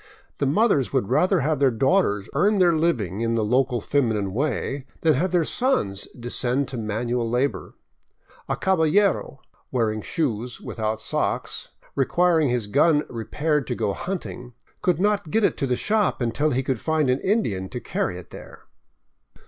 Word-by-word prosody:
The 140 - +1
mothers 145 - +2
would 100 - 0
rather 185 -2 +3
have 150 +1 0
their 140 -1 +4
daughters 115 - +1
earn 205 +9 +3
their 180 -3 +4
living 115 - 0
in 115 0 0
the 110 -2 +1
local 125 +2 +1
feminine 110 -6 0
way 140 +1 -2
than 160 -1 +4
have 170 +7 0
their 175 -3 +2
sons 105 - +1
descend 125 +3 0
to 130 - -5
manual 115 +2 -2
labor. 125 +4 -1 0.7
A - - +1
" - - -18
caballero," 185 -3 +1 0.3
wear 115 -4 +1
ing 110 0 -4
shoes, 120 - -2
without 110 -1 -3
socks, - - -2 0.2
requiring 160 +2 +2
his 120 -3 0
gun 145 +7 +3
repaired 145 +4 -1
to - - -2
go 105 -3 -1
hunting, 125 - -6 0.3
could 175 -3 +1
not 205 -3 +1
get 220 +7 +1
it - - +3
to 140 - -1
the 125 - +1
shop 210 - +1
until 120 +5 0
he 130 -1 0
could 130 -3 -2
find 155 -3 +1
an 130 +1 +2
Indian 105 - 0
to 125 - -5
carry 90 - -2
it 90 - -12
there. - - -12
135 Hz, 170 wpm, -24 LUFS, 115-165 Hz, 0.7 s, their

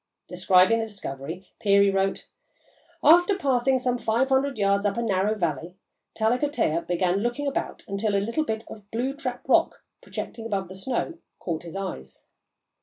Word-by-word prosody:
Describing 185 +4 +4
the 225 - -1
discovery, 175 -4 -6
Peary 200 -1 +4
wrote: 195 0 0 0.8
"After 350 +6 +6
passing 265 -5 +2
some 250 -1 -1
five 235 +5 +1
hundred 270 0 +1
yards 200 -1 +2
up 205 +1 0
a - - 0
narrow 205 0 +1
valley, 170 -1 -3 0.4
Tallakotteah 225 - 0
began 180 +2 +1
looking 240 +6 -2
about 280 - -3
until 200 0 -1
a 230 +10 0
bit 220 -5 -3
of 205 -2 -12
blue 245 +5 -2
trap 285 +2 -6
rock, - - +2 0.2
projecting 225 -1 -6
above 195 -4 -2
the - - -8
snow, 255 - -3 0.2
caught 165 -3 -4
his 170 +1 -10
eyes. 65 - -6
210 Hz, 155 wpm, -25 LUFS, 190-245 Hz, 0.8 s, After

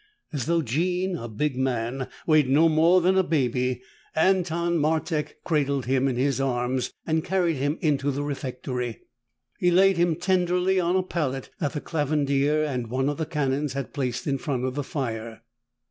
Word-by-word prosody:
As 140 -3 -3
though 170 -1 +2
Jean, 180 +8 0
a 120 -8 -5
big 130 +6 -2
man, 130 0 -1 0.2
weighed 155 -4 +4
no 155 +5 +5
more 165 +3 +4
than 190 +2 +3
a - - +4
baby, 125 -5 0 0.3
Anton 170 -1 +2
Martek 155 0 0
cradled 140 -5 0
him 130 +1 +2
in 130 - 0
his 135 +1 +1
arms 125 -1 -1
and 160 -1 0
carried 175 -4 +1
him 145 +4 -1
into 145 -3 +1
the 140 +1 -2
refectory. 125 -4 -4 0.6
He 180 - +3
laid 190 +1 +5
him 170 -1 +2
tenderly 180 +1 +1
on 175 0 +1
a 185 - +2
pallet 140 -8 -3
that 145 -5 -1
the 150 - -3
Clavandier 145 -1 +1
and 125 -6 -2
one 130 +3 0
of 145 - -3
the 160 -1 -2
Canons 145 -2 -1
had 140 -4 -5
placed 125 -4 -2
in 135 -2 0
front 130 -2 -2
of 130 - -2
the 145 +1 -2
fire. 115 -5 -5
145 Hz, 175 wpm, -25 LUFS, 130-170 Hz, 0.6 s, no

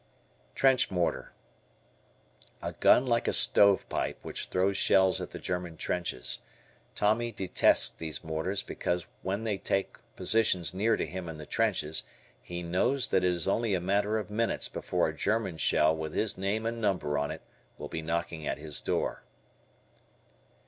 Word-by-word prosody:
Trench 130 -1 +4
Mortar. 90 -3 -1 1.3
A - - -5
gun 125 - +4
like 115 -2 +1
a - - +1
stove 100 +12 +6
pipe - - -2
which - - -5
throws 95 +2 +1
shells 95 -1 +3
at - - -5
the - - -8
German 90 -2 -4
trenches. 60 -11 -1 0.6
Tommy 115 +3 +1
detests 95 -4 +3
these 80 -5 -6
mortars 80 +5 -2
because 90 -1 -3 0.2
when 100 +3 -3
they 105 -3 -2
take 95 - -2 0.2
positions 95 -7 +1
near 110 +4 +1
to - - -1
him 90 -2 -6
in 80 - -7
the 75 - -9
trenches, 75 +1 0 0.4
he 90 0 -6
knows 120 +10 0
that - - +2
it 90 - +3
is 85 -1 0
only 110 0 +1
a - - 0
matter 100 +4 0
of 105 -1 -5
minutes 115 +2 0
before - - -1
a - - -5
German 100 -6 -1
Shell 80 +1 +3
with 80 -1 -5
his 110 - +1
name 100 +4 -2
and 115 0 -3
number 90 -8 0
on 75 - -2
it - - -7 0.3
will 75 - -7
be 80 - -5
knocking 85 -1 -3
at - - -2
his 75 -1 -2
door. - - -2
95 Hz, 165 wpm, -29 LUFS, 80-105 Hz, 1.3 s, stove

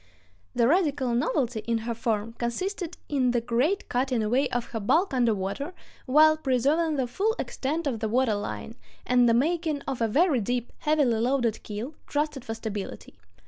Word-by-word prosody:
The 235 - +4
radical 290 -6 +2
novelty 245 -1 0
in 230 -1 +2
her 235 - -1
form 225 -1 -2
consisted 345 - -3
in 265 -4 +1
the 240 0 +2
great 250 - 0
cutting 250 -2 0
away 255 +6 +1
of 245 -1 -1
her 225 - -3
bulk 320 - +2
under 240 -4 +3
water 200 - -4 0.3
while 310 +4 +6
preserving 300 +3 +1
the 265 -3 0
full 400 - 0
extent 305 +5 -3
of 250 -6 -1
the 220 0 -2
water 245 0 +2
line, 205 +2 -4 0.3
and 245 -1 +4
the 230 - +4
making 315 +2 0
of 270 -4 -4
a 230 - +3
very 295 - +3
deep, 245 +3 -2
heavily 290 -7 +2
loaded 240 -2 +1
keel, 220 +7 -6
trusted 295 -3 -2
for 225 - -5
stability. 205 - -6
250 Hz, 175 wpm, -27 LUFS, 230-300 Hz, 0.3 s, while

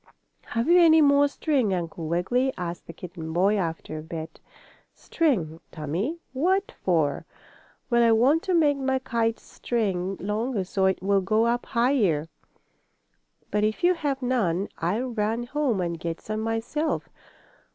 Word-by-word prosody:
"Have 230 +1 -1
you 350 +1 +6
any 320 -2 +7
more 285 -1 +5
string, 275 - 0
Uncle 165 -2 -4
Wiggily?" 240 +11 +1
asked 175 -1 -5
the - - -7
kitten 165 -1 -8
boy, 195 +5 +3
after 165 -4 -3
a - - -6
bit. 160 0 -7 0.6
"String, 185 - -1
Tommie? 175 - -3 0.2
What 380 - +1
for?" 160 -6 0 0.6
"Well, 235 0 +4
I 230 -1 +5
want 260 +8 +4
to 370 - +1
make 295 -4 +3
my 265 0 +1
kite 230 -3 -1
string 195 -5 -2
longer 210 +2 -1
so 190 +1 0
it 190 -1 -1
will 200 0 +3
go 215 +4 +2
up 240 +1 0
higher. 230 - +1 1.2
But 210 +1 +1
if 215 +9 -1
you 360 +1 +5
have 285 -5 -3
none 205 -7 0
I'll 210 +10 -1
run 225 +1 -1
home 260 -4 -1
and 170 -2 -3
get 165 0 -4
some 215 0 -4
myself. 225 +8 -2
220 Hz, 150 wpm, -25 LUFS, 175-265 Hz, 1.2 s, any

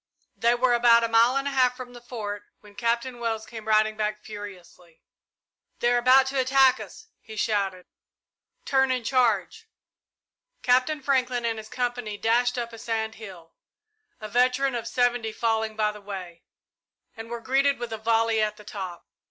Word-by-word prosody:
They 235 +1 +2
were 245 0 +2
about 235 -1 +5
a - - +2
mile 230 +3 +4
and 275 +1 0
a - - -1
half 255 -2 +2
from 250 -1 -9
the 240 - -12
Fort 210 -4 -6 0.2
when 210 -1 -16
Captain 235 +2 -1
Wells 225 -2 -2
came 220 -2 -10
riding 215 0 +3
back 210 0 -2
furiously. 185 -5 -11 0.8
"They 240 0 +2
are 240 - +3
about 255 +2 +6
to 270 0 -1
attack 265 0 +4
us," - - -10
he 220 - -12
shouted. 200 -4 -1 0.8
"Turn 265 -1 +2
and 255 -2 -1
charge!" 245 - +1 1.0
Captain 255 +4 +2
Franklin 255 -3 0
and 225 -1 -1
his 215 0 -10
company 245 -4 -3
dashed 245 +3 +1
up 235 -1 -4
a 230 - -10
sand 220 -1 -2
hill, 175 -6 -11 0.7
a 215 - -6
veteran 255 +4 +2
of 235 -2 -4
seventy 245 -3 0
falling 220 -1 -1
by 215 -1 +1
the 210 0 -12
way, 185 -4 -8 0.7
and 225 0 -9
were 235 0 -5
greeted 275 +3 +2
with 240 -2 -5
a 220 - -5
volley 225 0 +2
at 210 0 -1
the 210 - -13
top. 185 -4 -7
230 Hz, 175 wpm, -25 LUFS, 215-250 Hz, 1.0 s, about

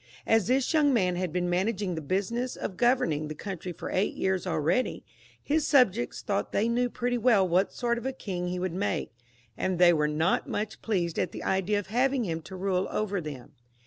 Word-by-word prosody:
As 225 -3 +3
this 260 +3 +2
young 300 -2 +4
man 180 -5 +2
had 180 -1 -2
been 180 +1 -1
managing 190 +2 0
the 160 - -4
business 205 - -1
of 190 - -5
governing 170 - +2
the 155 - -6
country 180 +1 -6
for 170 - -7
eight 190 +3 0
years 190 -1 -1
already, 165 - 0 0.4
his 305 +1 +1
subjects 240 -5 +3
thought 200 -2 -1
they 210 +3 +1
knew 245 +1 +1
pretty 245 0 -1
well 215 -5 +4
what 180 +3 +2
sort 235 -1 -1
of 235 - -10
a - - 0
king 185 -9 -4
he 180 +1 -2
would 180 -1 -2
make, 185 -6 -2 0.4
and 185 -1 -1
they 175 0 +6
were 150 -2 +2
not 160 +4 0
much 215 +1 -3
pleased 175 -7 -1
at - - 0
the - - -6
idea 190 +2 +1
of 205 - -2
having 260 +1 +2
him 165 -3 -3
to 180 +4 -10
rule 185 0 0
over 205 -3 -1
them. 145 -6 -8
190 Hz, 210 wpm, -28 LUFS, 175-235 Hz, 0.4 s, they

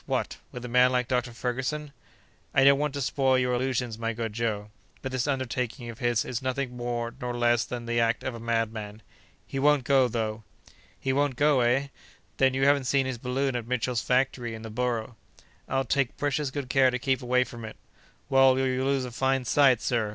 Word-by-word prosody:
What! - - -2
with 125 0 -7
a - - -4
man 125 +1 +4
like 125 -1 0
Dr. 125 -1 0
Ferguson?" 130 +5 -3 0.6
"I 135 - +5
don't 140 0 +6
want 150 -1 -1
to 140 - -2
spoil 130 0 +2
your 125 -1 +1
illusions, 125 -2 -1
my 115 0 -1
good 115 -1 -4
Joe; 105 -2 -2 0.3
but 130 - -3
this 130 +1 -1
undertaking 125 -2 -2
of 115 - -14
his 120 -2 +1
is 125 0 -3
nothing 130 -1 -2
more 120 -1 -3
nor 120 -1 -3
less 120 -1 +2
than 120 -1 -6
the 120 0 0
act 115 0 +1
of 130 - -3
a 115 - -7
madman. 110 -2 -3 0.4
He 135 - -4
won't 145 -1 +4
go, 135 -1 +4
though!" 110 -2 -3 0.6
"He 130 - -1
won't 140 -1 +1
go, 145 0 +3
eh? 125 +3 +2 0.5
Then 130 -1 +3
you 135 0 +2
haven't 140 -1 +3
seen 135 +1 +2
his 130 -3 -4
balloon 130 +2 -1
at 120 -2 -3
Mitchell's 125 -1 -1
factory 125 -2 0
in 110 - -9
the 110 - -7
Borough?" 120 -1 -2 0.5
"I'll 135 0 0
take 140 -3 0
precious 145 0 -1
good 135 0 -5
care 130 0 +4
to 125 - -1
keep 130 +1 0
away 125 0 +2
from 120 -2 -10
it!" 110 - -8 0.5
"Well, 135 -1 +5
you'll 130 0 0
lose 135 -2 +1
a 125 - -7
fine 130 +1 0
sight, 130 -2 +4
sir. 115 -4 0
125 Hz, 210 wpm, -27 LUFS, 120-135 Hz, 0.6 s, don't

